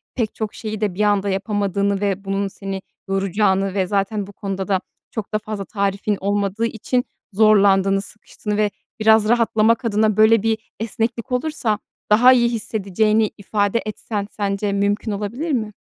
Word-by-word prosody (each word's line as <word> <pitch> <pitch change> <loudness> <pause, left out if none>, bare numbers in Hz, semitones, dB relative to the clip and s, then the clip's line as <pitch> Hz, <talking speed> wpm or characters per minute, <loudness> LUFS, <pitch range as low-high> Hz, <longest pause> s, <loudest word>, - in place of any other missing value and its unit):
pek 225 -4 -2
çok 215 -2 -4
şeyi 215 -1 -5
de 205 -3 0
bir 205 - -2
anda 205 -1 +2
yapamadığını 200 0 0
ve 200 -1 -1
bunun 195 +1 -1
seni 195 0 -6 0.3
yoracağını; 195 0 +1
ve 190 -2 0
zaten 200 0 -1
bu 200 - -12
konuda 195 -1 -4
da 195 -2 +2 0.3
çok 220 -1 -5
da 215 - +2
fazla 215 -2 -5
tarifin 200 0 -1
olmadığı 200 +2 0
için 240 +2 -1 0.3
zorlandığını, 195 -2 +4
sıkıştığını 210 +1 -6
ve 210 -1 +2 0.3
biraz 220 0 +5
rahatlamak 230 0 +3
adına 215 -1 +2
böyle 220 0 +5
bir 225 -1 +2 0.2
esneklik 230 +2 -3
olursa 250 -5 -1 0.3
daha 240 +5 +7
iyi 240 -2 +3
hissedeceğini 215 -1 +1
ifade 205 +2 0
etsen, 210 -1 -4
sence 200 0 -1
mümkün 205 +2 0
olabilir 220 +11 -3
mi? 215 -6 -1
210 Hz, 155 wpm, -21 LUFS, 200-220 Hz, 0.3 s, daha